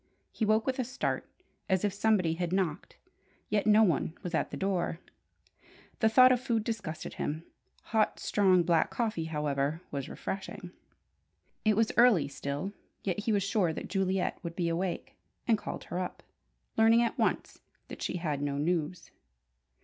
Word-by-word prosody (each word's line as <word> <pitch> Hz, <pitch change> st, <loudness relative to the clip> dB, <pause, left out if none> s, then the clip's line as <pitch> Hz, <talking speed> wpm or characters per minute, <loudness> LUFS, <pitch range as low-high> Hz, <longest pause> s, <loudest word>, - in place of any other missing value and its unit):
He 220 Hz, -, -1 dB
woke 215 Hz, +1 st, +3 dB
with 265 Hz, 0 st, -1 dB
a -, -, +2 dB
start, 260 Hz, +3 st, -3 dB, 0.4 s
as 190 Hz, +1 st, +2 dB
if 200 Hz, -, 0 dB
somebody 200 Hz, -5 st, +2 dB
had 175 Hz, 0 st, -2 dB
knocked; 185 Hz, -3 st, -2 dB, 0.5 s
yet 210 Hz, 0 st, +1 dB
no 215 Hz, +1 st, +7 dB
one 165 Hz, -3 st, +1 dB
was 180 Hz, -, -5 dB
at -, -, 0 dB
the -, -, -6 dB
door. 190 Hz, -4 st, -1 dB, 1.0 s
The 220 Hz, -, +4 dB
thought 255 Hz, +3 st, +7 dB
of 250 Hz, -, +3 dB
food 230 Hz, -3 st, 0 dB
disgusted 200 Hz, -9 st, -4 dB
him; 155 Hz, +2 st, -3 dB, 0.4 s
hot, 220 Hz, -2 st, +1 dB
strong 185 Hz, -4 st, +3 dB
black 165 Hz, -1 st, +3 dB
coffee, 215 Hz, -9 st, -1 dB
however, 150 Hz, 0 st, -1 dB
was 140 Hz, -2 st, -4 dB
refreshing. 190 Hz, -2 st, -6 dB, 0.9 s
It 215 Hz, -1 st, +3 dB
was 225 Hz, -1 st, +3 dB
early 230 Hz, -, +6 dB
still, 145 Hz, +7 st, -4 dB, 0.3 s
yet 190 Hz, 0 st, -1 dB
he 220 Hz, +2 st, -1 dB
was 200 Hz, -2 st, +2 dB
sure 195 Hz, -4 st, +1 dB
that -, -, -6 dB
Juliet 190 Hz, -1 st, 0 dB
would 170 Hz, -1 st, -5 dB
be 170 Hz, -2 st, 0 dB
awake, 175 Hz, +2 st, -2 dB, 0.3 s
and 230 Hz, -, +5 dB
called -, -, -6 dB
her 180 Hz, -, -4 dB
up, 180 Hz, -, -5 dB, 0.5 s
learning 225 Hz, +1 st, +6 dB
at 235 Hz, -, -2 dB
once -, -, -1 dB, 0.3 s
that -, -, -9 dB
she -, -, -2 dB
had 150 Hz, -5 st, -2 dB
no 140 Hz, -1 st, -1 dB
news. 170 Hz, +2 st, -1 dB
185 Hz, 165 wpm, -30 LUFS, 165-215 Hz, 1.0 s, no